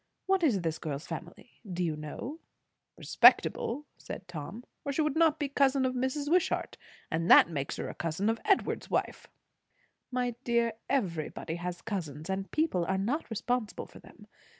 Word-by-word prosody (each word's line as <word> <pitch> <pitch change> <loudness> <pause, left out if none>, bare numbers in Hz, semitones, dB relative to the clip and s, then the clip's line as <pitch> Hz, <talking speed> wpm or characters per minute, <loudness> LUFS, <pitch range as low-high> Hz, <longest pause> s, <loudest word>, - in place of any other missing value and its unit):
What 385 -1 +2
is 245 - +3
this 165 -2 -2
girl's 150 -1 -4
family, 175 +7 -9
do 180 0 -1
you 160 -3 0
know?" 230 - -6 0.6
"Respectable," 280 +6 +4
said 185 - -8
Tom, 180 +7 -7 0.2
"or 280 - -2
she 310 +3 +1
would 300 -2 0
not 320 -1 +4
be 300 - -1
a - - -4
cousin 275 -1 +3
of 255 - 0
Mrs. 260 +3 -1
Wishart. 350 +3 +1 0.4
And 165 +2 0
that 170 - +8
makes 140 -3 -3
her - - -3
a - - -5
cousin 170 +5 -2
of 225 0 0
Edward's 395 -2 +1
wife." - - -1 0.8
"My 250 -1 -1
dear, 235 -2 +2 0.2
everybody 170 - -1
has 175 0 -5
cousins; 160 -5 -4
and 195 0 -3
people 305 - +1
are 190 +2 0
not 240 +12 -1
responsible 230 0 -2
for - - -14
them. - - -16
225 Hz, 175 wpm, -30 LUFS, 170-275 Hz, 0.8 s, that